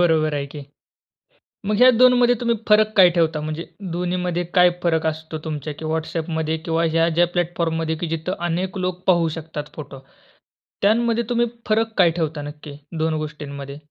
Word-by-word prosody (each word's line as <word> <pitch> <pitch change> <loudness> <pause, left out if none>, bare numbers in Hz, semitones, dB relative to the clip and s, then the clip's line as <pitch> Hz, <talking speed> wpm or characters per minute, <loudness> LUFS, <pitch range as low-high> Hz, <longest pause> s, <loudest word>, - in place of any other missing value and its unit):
बरोबर 155 -3 +3
आहे, 140 -1 -2
की. 145 0 -9 1.0
म्हणजे 210 +4 +3
ह्या 255 - +9
2 255 +1 +7
मध्ये 245 0 +4
तुम्ही 235 -1 +1
फरक 215 0 +5
काय 180 -2 +8
ठेवता? 165 -3 +1
म्हणजे 155 +2 -4 0.3
दोन्हीमध्ये 180 0 -1
काय 180 -1 +6
फरक 160 -2 +1
असतो 160 0 -3
तुमच्या 150 -1 -4
किंवा 160 0 -2
WhatsAppमध्ये 160 0 -2
किंवा 165 0 -1
ह्या 165 +1 +2
ज्या 170 +1 +3
प्लॅटफॉर्ममध्ये, 165 -2 -1
की 170 - -3
जिथे 165 +2 -3
अनेक 185 +3 -2
लोक 180 0 -3
पाहू 170 -3 +4
शकतात 150 -2 -7
फोटो, 140 -3 -8 0.8
त्यामध्ये 230 +3 +2
तुम्ही 240 0 +2 0.2
फरक 225 +1 +1
काय 175 -4 +5
ठेवता 160 -3 -3
नक्की 145 0 -9 0.3
2 160 0 +1
गोष्टींमध्ये? 140 -2 -7
165 Hz, 165 wpm, -22 LUFS, 155-185 Hz, 1.0 s, ह्या